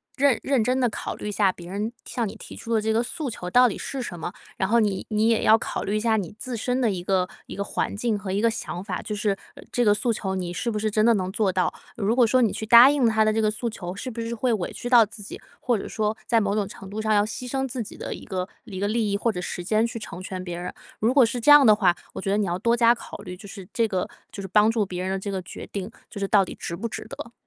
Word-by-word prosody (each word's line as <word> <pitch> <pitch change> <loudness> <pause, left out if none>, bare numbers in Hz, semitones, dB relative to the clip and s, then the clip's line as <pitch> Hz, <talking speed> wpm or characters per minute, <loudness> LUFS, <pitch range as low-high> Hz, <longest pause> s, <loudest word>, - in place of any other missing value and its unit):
认 280 -4 +3
认 270 -5 +2
真 255 +3 +1
地 245 -2 +3
考 - - -5
虑 - - -6
一 - - -2
下 200 -2 +3
别 175 -1 -11
人 205 +4 -2
向 235 -3 -2
你 - - -7
提 - - -11
出 230 - -4
的 220 - +3
这 220 +1 0
个 225 +1 +2
诉 280 +3 -4
求 180 -5 -6
到 250 +4 +6
底 - - -5
是 270 - -4
什 180 -8 -6
么。 175 - -5 0.2
然 190 - 0
后 235 +3 +4
你 205 -4 0
你 215 0 +2
也 230 -1 +2
要 220 - +7
考 - - -4
虑 205 - -1
一 - - 0
下 220 0 +2
你 190 -6 -4
自 255 -1 -5
身 250 +4 -1
的 235 - +3
一 185 -3 -3
个 185 -1 +1 0.2
一 - - -7
个 200 - -2
环 200 - -2
境 220 0 0
和 200 -1 -5
一 200 +2 0
个 230 - +4
想 205 -5 -5
法， 195 -3 -4
就 210 - -4
是， 205 0 0 0.2
呃， - - -12
这 245 - +1
个 205 - +6
诉 235 +3 0
求 195 -3 -2
你 180 -2 -3
是 200 +7 -2
不 215 - -2
是 215 +1 0
真 215 +1 +2
的 235 - +6
能 185 -3 -1
做 200 -1 +1
到。 185 -1 +1 0.2
如 220 -1 0
果 245 -1 +5
说 255 +3 +3
你 225 -4 +3
去 220 - -4
答 235 +4 +9
应 285 -3 +2
他 220 -1 +3
的 215 - +3
这 220 - 0
个 215 - +3
诉 235 +2 -3
求， 180 -5 -6
是 255 - -5
不 230 - -7
是 230 +1 -3
会 245 +2 0
委 195 -6 -2
屈 245 - -5
到 240 -3 +7
自 210 +1 -13
己， - - -8 0.2
或 245 -3 +1
者 - - -6
说 215 0 -1
在 230 - +4
某 200 -1 0
种 205 -2 0
程 195 -1 -11
度 210 +2 -5
上 215 0 +1
要 205 -1 +4
牺 235 +4 -6
牲 270 +1 -1
自 255 -1 -4
己 - - -11
的 - - -5
一 - - -9
个 185 -1 -3 0.2
一 195 -5 -7
个 200 - 0
利 215 -1 0
益 - - +1
或 230 +3 +1
者 180 - -5
时 180 - -5
间 215 +5 +2
去 235 0 -4
成 180 -4 -8
全 185 0 -5
别 175 -1 -5
人。 175 +1 -5 0.3
如 225 +3 +3
果 270 -3 +7
是 235 +2 -2
这 265 +5 +5
样 290 -2 +9
的 215 -2 +7
话， 185 -5 +3 0.2
我 - - -5
觉 195 - -2
得 200 - +2
你 210 - +1
要 175 0 -1
多 235 +3 +2
加 235 0 +6
考 235 - -9
虑， 180 -3 -7
就 200 +2 -11
是 195 -2 -10
这 230 -1 +2
个 190 -3 -1 0.2
就 200 - -7
是 190 - -6
帮 210 +3 +4
助 225 -2 +1
别 180 -1 -5
人 190 - -2
的 195 - 0
这 200 +1 -4
个 190 -1 -2
决 - - -9
定 195 0 -4 0.2
就 205 - -8
是 200 - -1
到 195 -1 +4
底 - - -8
值 170 - -4
不 215 +7 -3
值 - - -7
得。 235 - -8
215 Hz, 340 characters per minute, -25 LUFS, 195-235 Hz, 0.3 s, 答